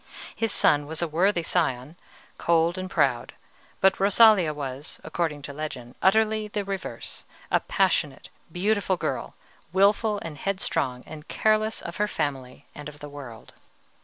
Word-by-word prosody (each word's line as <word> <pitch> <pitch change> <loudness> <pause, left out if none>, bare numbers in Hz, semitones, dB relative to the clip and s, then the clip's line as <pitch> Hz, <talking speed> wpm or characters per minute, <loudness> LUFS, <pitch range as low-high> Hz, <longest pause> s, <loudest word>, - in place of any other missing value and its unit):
His 225 -2 0
son 145 0 +3
was 160 +2 -2
a - - 0
worthy 170 +3 +1
scion, 150 -4 -1 0.4
cold 170 0 +2
and 185 0 -5
proud; 135 -9 +1 0.5
but 190 0 +4
Rosalia 200 -3 +6
was, 140 -1 -6
according 155 -3 -2
to 140 - -7
legend, 140 -5 -6
utterly 215 +2 +3
the 205 -1 -3
reverse, 195 -1 -6 0.3
a - - +4
passionate, - - 0 0.2
beautiful 195 0 0
girl, - - -3 0.4
wilful 205 +3 +3
and 155 -3 -7
headstrong, 135 -9 -1
and 155 -1 -10
careless 215 0 +1
of 170 - -6
her 210 - +1
family 135 -8 -4
and 150 -1 -8
the 145 0 -9
world. 130 -6 -10
170 Hz, 140 wpm, -26 LUFS, 145-200 Hz, 0.5 s, Rosalia